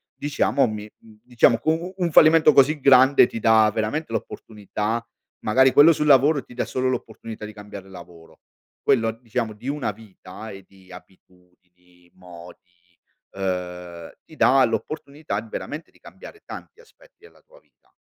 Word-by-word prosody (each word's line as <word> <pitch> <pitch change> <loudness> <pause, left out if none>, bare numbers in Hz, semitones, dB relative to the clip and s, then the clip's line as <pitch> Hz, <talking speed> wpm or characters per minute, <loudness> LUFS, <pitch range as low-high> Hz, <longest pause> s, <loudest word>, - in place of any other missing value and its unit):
diciamo, 140 -2 0
mi, 105 0 -7
mhmm, 110 -1 -20
diciamo 120 -1 +2
u 155 - +2
u 175 +3 -5
un 175 -3 -1
fallimento 155 -1 +6
così 145 +3 +4
grande 130 -1 +5
ti 115 - -7
dà 110 -1 +4
veramente 115 +4 -3
l'opportunità 110 +1 -5 0.4
magari 130 +4 +4
quello 150 +3 +7
sul 150 - -2
lavoro 140 0 +4
ti - - -16
dà 125 - -3
solo 130 0 -2
l'opportunità 110 -3 -6
di 105 - -9
cambiare 100 -2 -11
lavoro, 85 -3 -15 0.4
quello 115 -3 +1
diciamo 115 0 -5
di 115 +5 -12
una 145 -4 -2
vita 110 0 -12
e 95 -1 -11
di 95 -1 -22
abitudini, 90 -1 -20
modi, 90 0 -16 0.3
uhm, 90 -3 -5 0.2
ti 155 - -16
dà 135 0 +4
l'opportunità 140 0 -5
di 115 - -15
veramente 150 +8 -7
di - - -26
cambiare 425 - -14
tanti - - -11
aspetti - - -24
della 440 - -20
tua - - -22
vita. - - -38
115 Hz, 155 wpm, -22 LUFS, 95-140 Hz, 0.4 s, quello